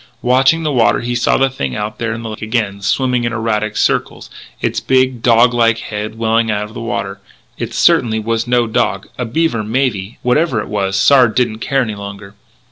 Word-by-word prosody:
Watching 135 +6 +3
the 155 - 0
water 120 -4 +2
he 120 +1 -3
saw 120 0 +2
the 135 -1 +2
thing 70 - -4
out 105 +1 -4
there 115 -1 -2
in 115 +1 -5
the 115 - -5
lake 110 - -9
again, 110 -3 -2
swimming 125 +4 0
in 120 - -1
erratic 110 -2 -2
circles, - - -1 0.3
its - - -1
big, 130 -2 +1
dog 120 +1 +4
like 115 -1 +3
head 110 0 -6
well 115 0 +1
out 115 -1 0
of 105 +1 -9
the 120 - -7
water. 100 -4 -4 0.4
It - - -4
certainly 110 -2 +3
was 115 +1 -2
no 120 -1 +2
dog. 100 -3 -1
A 125 - -1
beaver, 120 -2 0
maybe. 110 -3 -2
Whatever 125 0 +1
it - - -5
was, 95 -2 -1
Sard 125 +2 +4
didn't 120 -3 0
care 135 +3 0
any 110 -3 -4
longer. 100 0 -9
115 Hz, 205 wpm, -16 LUFS, 105-125 Hz, 0.4 s, dog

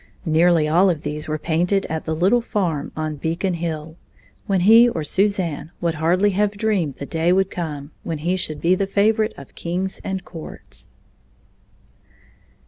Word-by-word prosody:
Nearly 165 0 +4
all 175 +5 +4
of 160 -4 -1
these 150 +1 -4
were 155 0 -1
painted 175 +5 0
at 160 0 -4
the 160 - -1
"little 190 +9 +3
farm" 175 -10 -2
on 155 -1 -3
Beacon 165 +5 -1
Hill, 160 -1 -4 0.5
when 195 -2 +2
he 225 +5 +7
or 165 -9 -3
Suzanne 180 -4 0
would 170 -1 0
hardly 175 +6 +2
have 205 +1 0
dreamed 200 -10 0
the 140 - -6
day 165 +3 +1
would 190 +1 +2
come 150 -4 -5
when 165 -2 -4
he 170 +5 0
should 155 -5 -3
be 175 +2 +3
the 195 +1 0
favorite 215 +2 +2
of 140 - -12
kings 185 +3 -3
and 190 -1 -4
courts. 160 -2 -8
170 Hz, 165 wpm, -21 LUFS, 155-195 Hz, 0.5 s, he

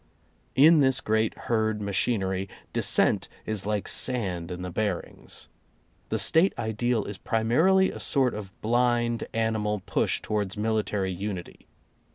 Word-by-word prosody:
In 155 +4 +7
this 130 -2 +3
great 110 -2 0
herd 110 -2 +1
machinery, 95 -2 -1 0.2
dissent - - +3 0.2
is 105 -2 -3
like 105 -2 -1
sand 95 -10 -1
in 90 0 -5
the 90 - -5
bearings. 100 -1 -4 0.6
The 110 - 0
State 160 - +3
ideal 110 +1 -1
is 100 -1 -6
primarily 160 +13 +3
a - - -8
sort 130 -4 +1
of 100 -3 -8
blind 120 0 +1
animal 110 -3 -1
push - - +1
towards 105 -2 -3
military 105 -3 0
unity. 95 -1 -6
110 Hz, 130 wpm, -27 LUFS, 100-120 Hz, 0.6 s, In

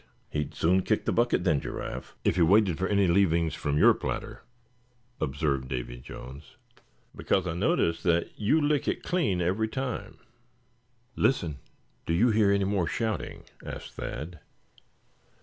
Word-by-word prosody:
"He'd 75 -1 -3
soon 90 +3 +3
kick - - 0
the - - +1
bucket, 120 -6 +2
then, 80 -7 +2
Giraffe, - - -6
if - - +2
he 90 - +2
waited 95 0 +4
for 95 - 0
any 100 0 +3
leavings 85 -4 +3
from 75 0 -1
your - - +7
platter," - - -5 0.8
observed 70 -1 -1
Davy - - -5
Jones; 65 +4 -11 0.6
"because 95 - 0
I 85 - -2
notice 85 - +1
that 85 -1 +1
you 115 +9 +2
lick 145 -1 +1
it - - -1
clean 145 - 0
every 95 +6 +1
time." 120 -3 -4 1.0
"Listen, 85 - +1 0.5
do 85 - +1
you 115 +8 +4
hear 105 -2 +4
any 100 -1 +2
more 95 -4 0
shouting?" 110 -2 -3 0.2
asked - - -8
Thad. 80 +2 -6
90 Hz, 150 wpm, -28 LUFS, 80-110 Hz, 1.0 s, your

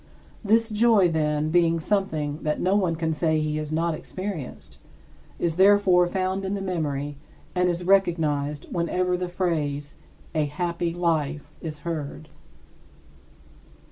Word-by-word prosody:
This 225 +2 +3
joy, 215 -4 +4
then, 155 -1 0
being 170 -1 +3
something 160 -6 -1
that 150 0 -1
no 185 +2 +2
one 185 -5 +2
can 160 0 -1
say 160 0 +1
he 155 0 -1
has 155 0 -4
not 165 +1 +1
experienced, 185 -3 -6 0.6
is 165 -1 -1
therefore 190 -2 +5
found 190 +1 -1
in 195 +1 -2
the - - -3
memory 145 -6 -2 0.4
and 180 0 +2
it - - +3
is 175 +1 -4
recognized 155 -6 +1
whenever 180 +1 0
the 180 0 -3
phrase 150 -6 -2 0.4
"a 155 -1 +1
happy 170 +3 -2
life" 155 -4 -1
is 155 -2 -5
heard. 155 -2 -5
170 Hz, 140 wpm, -25 LUFS, 155-185 Hz, 0.6 s, therefore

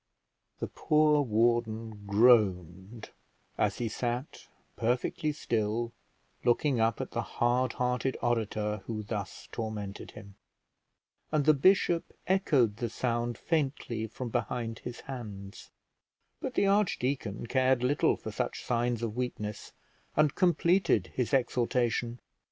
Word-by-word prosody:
The - - -3
poor 150 -1 +3
warden 115 -3 0
groaned 100 -2 +2 0.4
as - - 0
he 120 - -1
sat 120 +4 -4 0.3
perfectly 125 +6 0
still, 115 -4 -1 0.5
looking 125 +2 +2
up 115 -1 +2
at - - -4
the - - -1
hard 120 +1 0
hearted 125 +1 -1
orator 105 -3 -1
who 110 -2 -3
thus 100 -2 -5
tormented 105 -3 -5
him, 100 0 -12 1.0
and 150 -2 +1
the 155 - +7
bishop 175 +2 +3
echoed 140 - +2
the 120 0 -2
sound 120 0 -1
faintly 135 -8 -1
from 120 +3 -6
behind 115 0 -2
his 125 0 -7
hands; 105 -7 -8 0.7
but - - -5
the - - +3
archdeacon 135 - 0
cared 130 0 +2
little 135 +3 +3
for - - -7
such - - -3
signs 120 -1 0
of 110 -2 -2
weakness, 110 -4 -4 0.5
and 150 -2 +4
completed 175 - +2
his 125 -1 -1
exhortation. 120 -2 +1
120 Hz, 120 wpm, -30 LUFS, 110-130 Hz, 1.0 s, the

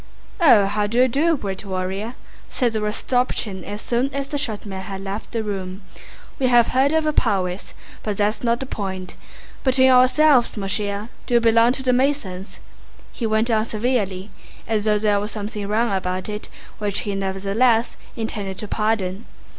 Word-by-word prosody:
"Ah, 250 - +6
how 205 +1 0
do 230 +3 -2
you 255 +1 +6
do, 305 +6 +2
great 195 -6 -5
warrior?" 195 +4 -3 0.3
said 245 -4 0
Rostopchín 215 -2 -1
as 205 +1 -6
soon 250 +3 0
as 275 0 -3
the 290 - -2
short 220 -8 -2
man 190 -2 -5
had 195 0 -6
left 195 +2 -5
the 230 -2 -2
room. 190 -2 -5 0.6
"We 260 - +2
have 240 -2 +5
heard 265 +2 +3
of 320 0 +2
your 305 0 0
prowess. 185 -7 -1 0.3
But 210 -2 -3
that's 210 +1 +1
not 235 0 +1
the 265 - -4
point. 190 -6 -5 0.5
Between 260 0 +4
ourselves, 255 0 +5
mon 195 -1 -3
cher, 205 +2 -2 0.2
do 245 - +1
you - - +7
belong 230 +1 +4
to 265 - -4
the 255 -1 +2
Masons?" 245 -8 -1 0.5
he 230 - -3
went 220 +2 +1
on 215 -1 +3
severely, 210 -5 -1 0.4
as 220 -2 0
though 210 -1 +3
there 205 -1 +2
were 205 - -3
something 210 -1 -5
wrong 220 +1 +1
about 185 0 -2
it 210 0 -6 0.3
which 205 -2 -1
he 205 - -3
nevertheless 200 +5 +1 0.2
intended 205 -4 -4
to 210 - -5
pardon. 210 -1 -1
215 Hz, 180 wpm, -22 LUFS, 200-245 Hz, 0.6 s, you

